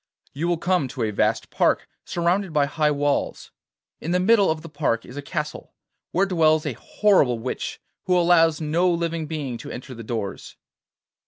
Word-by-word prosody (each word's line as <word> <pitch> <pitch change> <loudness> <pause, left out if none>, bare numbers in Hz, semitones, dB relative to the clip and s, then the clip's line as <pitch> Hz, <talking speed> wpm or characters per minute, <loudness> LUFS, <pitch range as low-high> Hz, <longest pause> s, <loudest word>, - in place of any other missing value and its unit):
You 160 +5 -2
will 175 -1 +1
come 175 -3 +1
to 130 -1 -4
a 110 - 0
vast 100 - 0
park - - +2 0.2
surrounded 175 +2 0
by 150 -2 +3
high 150 +1 +1
walls. 145 -1 -1 0.5
In 160 - -5
the 180 +1 +2
middle 200 +1 +4
of 160 0 -2
the - - -7
park 145 -7 -1
is 125 - -11
a 145 - -4
castle, 150 0 -5 0.4
where 190 +3 +2
dwells 160 -4 +3
a 145 - -1
horrible 145 - +2
witch 125 +3 -4 0.3
who 180 -1 +4
allows 165 -2 +4
no 165 +4 +1
living 170 -2 -1
being 145 -7 -4
to - - -8
enter 130 +1 -7
the 115 - -9
doors. 110 -3 -5
155 Hz, 180 wpm, -24 LUFS, 140-175 Hz, 0.5 s, middle